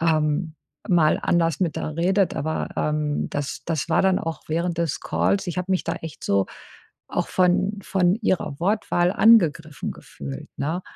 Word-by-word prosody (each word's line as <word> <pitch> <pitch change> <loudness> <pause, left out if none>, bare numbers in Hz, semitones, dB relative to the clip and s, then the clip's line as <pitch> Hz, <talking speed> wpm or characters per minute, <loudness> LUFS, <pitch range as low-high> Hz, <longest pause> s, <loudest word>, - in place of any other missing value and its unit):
ähm, 155 0 +1 0.3
mal 165 -4 +4
anders 165 0 +1
mit 170 -4 0
der 155 0 -4
redet, 190 +2 +2
aber, 160 +2 -2
ähm, 150 -1 -1
das 145 -1 -4
das 165 -1 -2
war 165 - +3
dann 190 -1 +3
auch 165 0 -4
während 170 +2 -1
des 165 -4 0
Calls. 195 -1 0
Ich 175 - -4
habe 180 +1 -3
mich 185 - +1
da - - -1
echt 160 -4 -9
so 100 -1 +2 0.6
auch - - -2
von 190 +3 +2
von 185 0 +2
Ihrer 155 -8 0
Wortwahl 180 -2 +1
angegriffen 165 -9 +3
gefühlt, 70 -1 -9
ne? 165 +6 -2
170 Hz, 165 wpm, -24 LUFS, 155-185 Hz, 0.6 s, mal